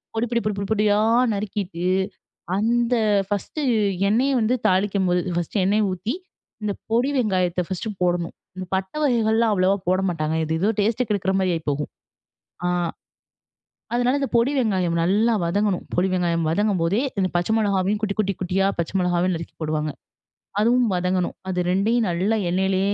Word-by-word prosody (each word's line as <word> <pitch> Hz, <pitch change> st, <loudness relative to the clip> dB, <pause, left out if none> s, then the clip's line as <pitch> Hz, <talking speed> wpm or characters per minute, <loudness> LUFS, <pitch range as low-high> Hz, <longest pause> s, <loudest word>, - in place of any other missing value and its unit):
பொடி 225 Hz, -, +1 dB
பொடி 235 Hz, -, +2 dB
பொடி 215 Hz, -, +1 dB
பொடி 200 Hz, -, -3 dB
பொடியா 210 Hz, -1 st, +3 dB, 0.3 s
நறுக்கிட்டு 200 Hz, -3 st, -3 dB, 0.7 s
அந்த 235 Hz, +4 st, +2 dB, 0.3 s
ஃபர்ஸ்ட்டு 205 Hz, +9 st, -3 dB, 0.5 s
எண்ணெய 245 Hz, +7 st, +2 dB
வந்து 230 Hz, +3 st, +2 dB
தாளிக்குபோது, 185 Hz, -1 st, +2 dB
ஃபர்ஸ்ட்டு 175 Hz, +3 st, -1 dB
எண்ணெய 210 Hz, +3 st, +2 dB
ஊத்தி 185 Hz, +7 st, -3 dB, 0.5 s
இந்த 205 Hz, -, 0 dB, 0.2 s
பொடி 240 Hz, +5 st, +2 dB
வெங்காயத்த 185 Hz, -6 st, +1 dB
ஃபர்ஸ்ட்டு 190 Hz, +4 st, -4 dB
போடணும், 175 Hz, -1 st, 0 dB, 0.2 s
இந்த 185 Hz, 0 st, -5 dB
பட்டை 190 Hz, +8 st, -3 dB
வகைகள்லாம் 230 Hz, -4 st, +2 dB
அவ்வளோவா 190 Hz, +1 st, +2 dB
போட 185 Hz, +1 st, +2 dB
மாட்டாங்க. 160 Hz, -2 st, -1 dB
எது 160 Hz, +1 st, -1 dB
எதோ 200 Hz, -, +2 dB
டேஸ்ட்ட 225 Hz, +4 st, +1 dB
கெடுக்குற 195 Hz, -2 st, 0 dB
மாரி 185 Hz, -1 st, +1 dB
ஆயி 165 Hz, -, -5 dB
போகும். 145 Hz, +1 st, -3 dB, 0.7 s
அ. 180 Hz, -, +2 dB, 1.3 s
அதனால 245 Hz, +3 st, +2 dB
இந்த 275 Hz, -, -1 dB
பொடி 235 Hz, +4 st, +3 dB
வெங்காயம் 190 Hz, -8 st, +1 dB
நல்லா 210 Hz, +6 st, +3 dB
வதங்கணும், 200 Hz, +2 st, 0 dB
பொடி 180 Hz, +2 st, +2 dB
வெங்காயம் 170 Hz, -2 st, 0 dB
வதங்கும்போதே, 190 Hz, +1 st, +1 dB, 0.2 s
இந்த 185 Hz, -1 st, +1 dB
பச்சை 175 Hz, +4 st, +1 dB
மிளகாவையும் 200 Hz, -1 st, +1 dB
குட்டி, 205 Hz, -2 st, 0 dB
குட்டி, 200 Hz, -2 st, +1 dB
குட்டியா 185 Hz, +1 st, +1 dB
பச்சை 170 Hz, 0 st, -2 dB
மிளகாவையும் 180 Hz, 0 st, +1 dB
நறுக்கி 165 Hz, 0 st, -7 dB
போடுவாங்க. 155 Hz, -1 st, -1 dB, 0.7 s
அதுவும் 240 Hz, +2 st, +3 dB
வதங்கணும். 180 Hz, 0 st, 0 dB
அது 180 Hz, -1 st, -1 dB
2யும் 220 Hz, +5 st, +2 dB
நல்லா 190 Hz, +6 st, +1 dB
எண்ணெயிலேயே 190 Hz, +2 st, +1 dB
195 Hz, 150 wpm, -23 LUFS, 180-220 Hz, 1.3 s, பொடியா